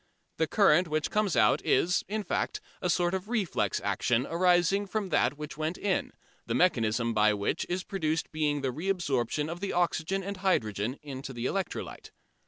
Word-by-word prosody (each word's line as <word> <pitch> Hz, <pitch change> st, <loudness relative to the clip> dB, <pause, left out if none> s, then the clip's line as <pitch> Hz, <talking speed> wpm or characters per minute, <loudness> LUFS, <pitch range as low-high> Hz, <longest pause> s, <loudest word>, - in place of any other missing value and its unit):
The 160 Hz, -, +1 dB
current 180 Hz, -3 st, +4 dB
which 155 Hz, -1 st, -1 dB
comes 210 Hz, -5 st, +1 dB
out -, -, +4 dB
is, 180 Hz, +2 st, +2 dB
in 215 Hz, +1 st, -2 dB
fact, 175 Hz, -, -2 dB, 0.2 s
a 180 Hz, -, 0 dB
sort 175 Hz, 0 st, +2 dB
of 190 Hz, +2 st, -3 dB
reflex 195 Hz, -, 0 dB
action 110 Hz, +6 st, +1 dB
arising 180 Hz, +3 st, +2 dB
from 200 Hz, 0 st, -2 dB
that 135 Hz, -3 st, +2 dB
which 150 Hz, 0 st, -7 dB
went 155 Hz, +3 st, -2 dB
in, 195 Hz, -3 st, -1 dB, 0.4 s
the -, -, -1 dB
mechanism 115 Hz, -8 st, +2 dB
by 105 Hz, 0 st, +4 dB
which 100 Hz, 0 st, -1 dB
it -, -, -27 dB
is 180 Hz, +1 st, -1 dB
produced 160 Hz, -4 st, -2 dB
being 150 Hz, -2 st, 0 dB
the 135 Hz, -1 st, -1 dB
reabsorption 150 Hz, -5 st, -1 dB
of 170 Hz, +2 st, -5 dB
the 200 Hz, +1 st, -3 dB
oxygen 175 Hz, +2 st, 0 dB
and 200 Hz, +1 st, -5 dB
hydrogen 120 Hz, -, 0 dB
into 135 Hz, -2 st, -7 dB
the 120 Hz, 0 st, -4 dB
electrolyte. 195 Hz, +6 st, -3 dB
165 Hz, 180 wpm, -29 LUFS, 130-190 Hz, 0.4 s, current